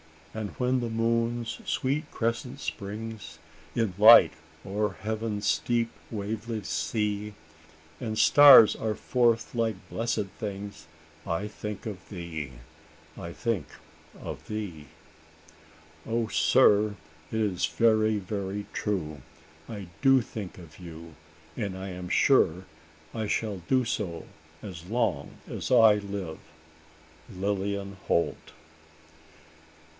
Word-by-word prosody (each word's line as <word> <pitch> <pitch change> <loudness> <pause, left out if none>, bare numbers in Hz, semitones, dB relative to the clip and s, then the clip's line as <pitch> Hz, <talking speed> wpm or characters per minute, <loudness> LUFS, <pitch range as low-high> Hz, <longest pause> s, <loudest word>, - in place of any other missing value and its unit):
And 110 -2 -4
when 125 +1 0
the 120 -1 -2
moon's 115 +1 0
sweet 145 +3 -1
crescent 120 +4 -2
springs 110 +1 -6 0.4
In 115 -5 0
light 105 -6 +9 0.3
o'er 105 +1 -1
heaven's 110 -1 -1
deep 120 -1 +1 0.2
waveless 110 0 -4
sea; 105 +4 -2 0.6
And 110 -2 -3
stars 140 -6 +9
are 110 -1 -2
forth 120 -2 +1
like 115 -3 0
blessed 115 -3 -1
things, 100 -6 -6 0.4
I 95 +4 -1
think 105 -1 -7
of 100 -5 -7
thee 80 -7 -6 0.6
I 85 - -7
think 115 - -2 0.5
of - - -8
thee!" 95 -9 -5 1.2
"O 115 -1 -1
sir! 105 - +4 0.4
it 110 - -1
is 100 -5 +1
very, 110 -2 +3
very 100 0 -4
true! 80 -9 -2 0.5
I 100 -5 -6
do 135 -2 +6
think 105 -4 -7
of 85 -3 -13
you; 85 -2 -10 0.4
and 100 -2 -3
I 95 +1 -6
am 90 -1 -7
sure 95 -8 +3 0.5
I 110 -2 -2
shall 105 -1 -1
do 130 -1 +3
so 100 -8 -3 0.4
as 90 -5 -8
long 120 +4 -1
as - - -5
I 115 -4 +7
live. 100 -5 -5 0.9
"Lilian 100 0 -3
Holt." 85 - 0
105 Hz, 110 wpm, -28 LUFS, 95-115 Hz, 1.2 s, light